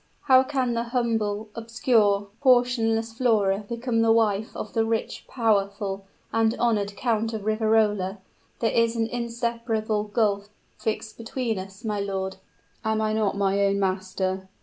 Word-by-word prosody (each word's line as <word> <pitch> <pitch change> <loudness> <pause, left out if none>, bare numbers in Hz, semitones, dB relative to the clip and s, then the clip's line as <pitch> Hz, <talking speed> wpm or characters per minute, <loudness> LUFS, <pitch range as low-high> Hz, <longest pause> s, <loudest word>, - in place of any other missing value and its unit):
how 260 -1 +6
can 260 -3 -1
the 235 0 -1
humble, 225 -3 -1
obscure, 225 -3 +1
portionless 240 -3 +3
Flora 215 -5 +2
become 235 -1 0
the 225 0 +4
wife 220 -2 +2
of 215 - -6
the 225 - +2
rich, 225 0 -2
powerful 200 -4 0 0.3
and 225 +1 +2
honored 210 -4 +1
Count 225 -2 0
of 215 -2 -5
Riverola? 215 -3 +2 0.4
There 225 - +2
is 230 0 +2
an 225 -1 +1
inseparable 230 -2 -2
gulf 205 -2 0 0.3
fixed 220 0 -3
between 230 -2 -2
us, 190 +4 -10
my 210 -2 -1
lord." 190 -1 -3 0.5
"Am 220 0 0
I 215 0 0
not 215 -2 0
my 200 0 +2
own 200 0 +2
master? 190 0 -2
220 Hz, 145 wpm, -25 LUFS, 200-230 Hz, 0.5 s, how